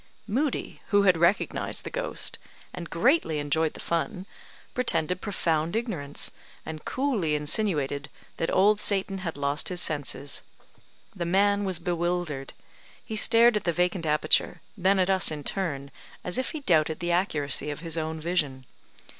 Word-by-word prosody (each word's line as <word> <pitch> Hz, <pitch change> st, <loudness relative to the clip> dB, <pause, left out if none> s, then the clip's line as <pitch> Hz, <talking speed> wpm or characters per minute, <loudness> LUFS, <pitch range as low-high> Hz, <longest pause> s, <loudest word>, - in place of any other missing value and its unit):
Moodie, 255 Hz, +7 st, -2 dB
who 205 Hz, -1 st, +4 dB
had 185 Hz, -3 st, +5 dB
recognised 170 Hz, +5 st, +1 dB
the -, -, -6 dB
ghost, -, -, -2 dB, 0.3 s
and 170 Hz, -2 st, -7 dB
greatly 215 Hz, -, +2 dB
enjoyed 150 Hz, +2 st, 0 dB
the -, -, -9 dB
fun, 180 Hz, +3 st, -2 dB, 0.5 s
pretended 185 Hz, -8 st, 0 dB
profound 165 Hz, -4 st, -1 dB
ignorance, 180 Hz, -12 st, -2 dB, 0.3 s
and 155 Hz, -1 st, -7 dB
coolly 230 Hz, -, 0 dB
insinuated 150 Hz, -3 st, 0 dB, 0.3 s
that 165 Hz, -, -1 dB
Old 205 Hz, +2 st, +4 dB
Satan 195 Hz, -1 st, +3 dB
had 165 Hz, -5 st, -4 dB
lost 140 Hz, +1 st, 0 dB
his 180 Hz, -1 st, 0 dB
senses. 145 Hz, -3 st, 0 dB, 0.7 s
The 175 Hz, -3 st, -3 dB
man 200 Hz, +3 st, +3 dB
was 190 Hz, -3 st, 0 dB
bewildered; 175 Hz, -5 st, -2 dB, 0.5 s
he 220 Hz, -, -5 dB
stared 230 Hz, +2 st, +5 dB
at 210 Hz, -, 0 dB
the 170 Hz, -, +1 dB
vacant 180 Hz, 0 st, 0 dB
aperture, 155 Hz, +3 st, +2 dB
then 195 Hz, 0 st, +3 dB
at 185 Hz, 0 st, +3 dB
us 190 Hz, -1 st, +3 dB
in 150 Hz, -2 st, -5 dB
turn, 140 Hz, -8 st, -3 dB, 0.3 s
as 180 Hz, +7 st, -1 dB
if 260 Hz, -, -1 dB
he 310 Hz, -, -6 dB
doubted 160 Hz, -, +2 dB
the 175 Hz, 0 st, -1 dB
accuracy 155 Hz, -5 st, +1 dB
of 145 Hz, +1 st, -5 dB
his 165 Hz, -2 st, -3 dB
own 160 Hz, 0 st, -3 dB
vision. 150 Hz, -6 st, -1 dB
175 Hz, 155 wpm, -27 LUFS, 155-200 Hz, 0.7 s, had